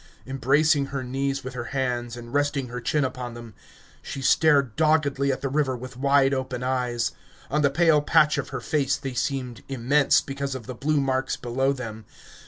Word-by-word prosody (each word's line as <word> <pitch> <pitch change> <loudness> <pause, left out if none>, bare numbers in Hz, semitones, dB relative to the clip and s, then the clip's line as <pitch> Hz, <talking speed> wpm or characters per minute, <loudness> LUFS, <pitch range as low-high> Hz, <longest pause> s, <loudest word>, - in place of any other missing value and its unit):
Embracing 140 +2 +2
her 140 -1 -4
knees 135 +2 -2
with 130 0 -6
her 120 -2 -5
hands, 120 -2 -2
and 120 +1 -10
resting 145 -3 0
her 125 +1 -5
chin 145 +5 +1
upon 125 -2 -5
them, 120 -2 -10 0.5
she - - -6
stared 140 -3 +3
doggedly 145 -3 +2
at 130 - -3
the 140 - -1
river 135 -2 0
with 125 +1 -9
wide 140 +1 +3
open 130 -2 -3
eyes; 125 -2 0 0.4
on 150 +2 +2
the 140 - +4
pale 155 +1 +4
patch 150 +1 +3
of - - -4
her 130 -3 -5
face 140 0 0
they 135 -2 -5
seemed 125 -1 -3
immense, 135 +2 +3
because 135 -1 -4
of 125 -4 -7
the 130 - -6
blue 150 +4 0
marks 130 -1 0
below 130 +3 0
them. 110 -5 -6
135 Hz, 190 wpm, -25 LUFS, 125-140 Hz, 0.5 s, the